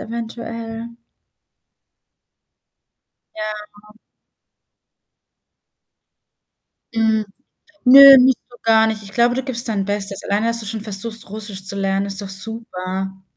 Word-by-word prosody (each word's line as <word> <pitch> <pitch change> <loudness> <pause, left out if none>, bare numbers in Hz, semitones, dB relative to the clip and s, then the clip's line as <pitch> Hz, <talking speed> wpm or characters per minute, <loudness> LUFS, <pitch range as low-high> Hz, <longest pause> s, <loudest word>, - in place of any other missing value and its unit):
eventuell. 230 0 -7 2.5
Ja. 210 0 -8 3.0
Mhm. 220 -1 +1 0.6
Nö, 275 +1 +10
nicht 255 -1 +4
so 245 - -16
gar 225 -1 +4
nicht. 220 -1 -4
Ich 195 - -11
glaube, 240 +4 +2
du 260 - -2
gibst 245 -2 -3
dein 205 -3 -2
Bestes. 200 -1 -3
Alleine, 210 +3 -1
dass 230 0 +1
du 225 - -4
schon 220 +1 -4
versuchst, 215 +1 -3
Russisch 205 -2 -7
zu 195 - -3
lernen, 195 0 -1
ist 200 0 -2
doch 200 - -7
super. 190 -2 -5
215 Hz, 110 wpm, -19 LUFS, 200-230 Hz, 3.0 s, Nö